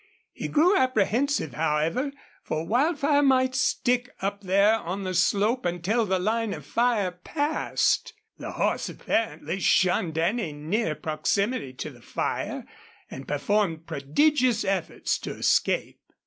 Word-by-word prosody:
He -, -, -5 dB
grew 340 Hz, +6 st, +4 dB
apprehensive, 255 Hz, -, +1 dB
however, 160 Hz, -, 0 dB, 0.3 s
for 155 Hz, +1 st, -3 dB
Wildfire 285 Hz, -, +2 dB
might 260 Hz, -2 st, +3 dB
stick 250 Hz, 0 st, +1 dB
up 200 Hz, +1 st, -3 dB
there 200 Hz, +3 st, +3 dB
on 190 Hz, +1 st, -4 dB
the 185 Hz, -1 st, -3 dB
slope 205 Hz, +7 st, +2 dB
until 180 Hz, +6 st, 0 dB
the 190 Hz, 0 st, +1 dB
line 220 Hz, +3 st, -1 dB
of -, -, -11 dB
fire 230 Hz, -6 st, +1 dB
passed. 290 Hz, -, -1 dB, 0.2 s
The -, -, -6 dB
horse -, -, 0 dB
apparently 195 Hz, -5 st, -2 dB
shunned 180 Hz, -3 st, +2 dB
any 170 Hz, 0 st, 0 dB
near 155 Hz, +4 st, -1 dB
proximity 155 Hz, -, -1 dB
to 125 Hz, -, -6 dB
the -, -, -17 dB
fire, -, -, -3 dB, 0.5 s
and 135 Hz, -, -8 dB
performed 165 Hz, +2 st, 0 dB
prodigious 230 Hz, -, +1 dB
efforts 190 Hz, -4 st, -1 dB
to -, -, -5 dB
escape. -, -, +1 dB
205 Hz, 130 wpm, -26 LUFS, 170-250 Hz, 0.5 s, grew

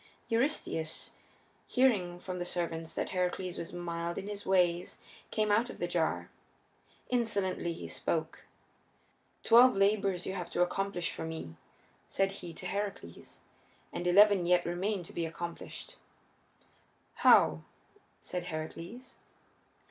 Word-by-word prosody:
Eurystheus, 230 Hz, -, -1 dB, 0.6 s
hearing 200 Hz, -10 st, +2 dB
from 180 Hz, 0 st, -5 dB
the -, -, -1 dB
servants 165 Hz, -2 st, -3 dB
that -, -, -2 dB
Heracles 180 Hz, 0 st, -1 dB
was 165 Hz, -, -6 dB
mild 170 Hz, -1 st, -3 dB
in 195 Hz, -, -4 dB
his 205 Hz, -1 st, -6 dB
ways, 180 Hz, -2 st, +2 dB, 0.3 s
came 215 Hz, -1 st, +1 dB
out 225 Hz, +4 st, +3 dB
of -, -, -8 dB
the 175 Hz, -, -1 dB
jar. 160 Hz, -, -1 dB, 0.8 s
Insolently 200 Hz, -8 st, 0 dB
he 165 Hz, -, -6 dB
spoke. -, -, -2 dB, 1.0 s
"Twelve 240 Hz, -1 st, +7 dB
labors 195 Hz, -2 st, +2 dB
you 190 Hz, -, -3 dB
have 180 Hz, -3 st, -4 dB
to 175 Hz, -, +2 dB
accomplish 180 Hz, -1 st, -1 dB
for -, -, -5 dB
me," 160 Hz, -, -6 dB, 0.5 s
said 195 Hz, 0 st, +1 dB
he 180 Hz, -3 st, -8 dB
to 175 Hz, -, -9 dB
Heracles, 195 Hz, -, -5 dB, 0.5 s
"and 175 Hz, -, -2 dB
eleven 195 Hz, -1 st, +6 dB
yet 180 Hz, 0 st, +4 dB
remain 185 Hz, +3 st, -1 dB
to -, -, -11 dB
be 165 Hz, -1 st, -1 dB
accomplished." 170 Hz, +1 st, -7 dB, 1.2 s
"How?" 80 Hz, 0 st, +6 dB, 0.6 s
said 180 Hz, -1 st, -5 dB
Heracles. 170 Hz, +10 st, -7 dB
180 Hz, 125 wpm, -32 LUFS, 170-200 Hz, 1.2 s, Twelve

